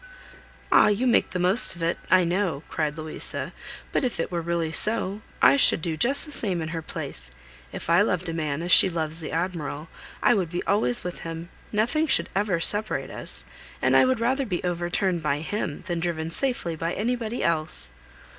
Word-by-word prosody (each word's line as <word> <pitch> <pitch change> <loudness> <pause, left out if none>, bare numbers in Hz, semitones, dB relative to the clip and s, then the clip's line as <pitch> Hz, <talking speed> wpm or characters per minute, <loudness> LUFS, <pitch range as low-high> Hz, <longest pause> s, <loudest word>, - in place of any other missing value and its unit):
"Ah! - - +6
You 210 +4 +1
make 245 - +3
the - - -4
most 185 +3 +6
of 170 - -7
it, 165 - 0
I 185 -1 +5
know," 170 -4 -1
cried 150 -1 -2
Louisa, 155 0 -3 0.4
"but - - 0
if 250 -8 -2
it 165 - -2
were 170 -1 -2
really 170 -1 -2
so, 210 +2 +2 0.2
I - - +7
should 275 - +5
do 160 0 -3
just 260 - +1
the 300 - -11
same 195 -10 -1
in 160 -1 -4
her 165 0 -4
place. 60 - -7 0.4
If - - -8
I - - +4
loved - - 0
a 165 - -3
man, 155 -1 -2
as 175 - -2
she - - +7
loves 160 -2 -2
the 160 - -6
Admiral, 165 -3 -3 0.3
I - - +5
would 175 -3 -1
always 125 - +1
be - - -5
with 180 - -7
him, 165 +1 -7 0.2
nothing 245 +10 +1
should - - +2
ever 195 -3 +1
separate 210 +5 -1
us, - - -4 0.3
and - - +2
I - - +6
would 255 -2 +1
rather 260 +3 0
be 180 -4 -3
overturned 175 0 -1
by 150 -1 -1
him, 165 -3 -4
than 175 -4 -2
driven 165 -1 -3
safely 240 -7 -2
by 165 +2 -3
anybody 235 +1 -2
else." 155 - +2
175 Hz, 200 wpm, -25 LUFS, 160-210 Hz, 0.4 s, I